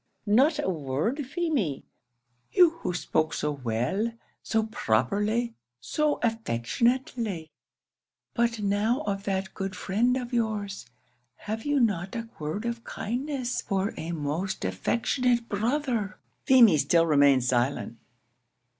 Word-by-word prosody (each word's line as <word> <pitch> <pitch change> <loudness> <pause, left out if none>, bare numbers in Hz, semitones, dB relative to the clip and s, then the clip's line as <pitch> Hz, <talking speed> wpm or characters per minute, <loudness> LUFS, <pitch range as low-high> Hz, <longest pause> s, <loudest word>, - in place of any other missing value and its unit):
not 265 +9 +4
a 295 - -1
word, 170 - -1
Feemy? 275 - -1 0.7
you 355 -3 +6
who 330 - -2
spoke 155 -2 0
so 150 - -1
well, 135 - -1 0.3
so 220 0 0
properly, 210 - +1 0.3
so 295 - 0
affectionately, 225 - -1 0.8
but 235 -1 +1
now 210 +7 +1
of 200 -4 -3
that 190 -1 -2
good 195 -1 -4
friend 235 +8 +1
of 250 -1 -5
yours 210 - -2 0.5
have 220 +2 -5
you 290 -1 +2
not 195 -6 0
a 230 0 -4
word 155 +9 -3
of 235 0 -3
kindness 255 +2 -3
for 195 +1 -1
a 165 - -5
most 165 - -2
affectionate 235 - 0
brother?" 230 -1 -1 0.3
Feemy 230 - +7
still 165 +3 +4
remained 140 -4 +5
silent. 120 -1 0
210 Hz, 120 wpm, -27 LUFS, 160-240 Hz, 0.8 s, Feemy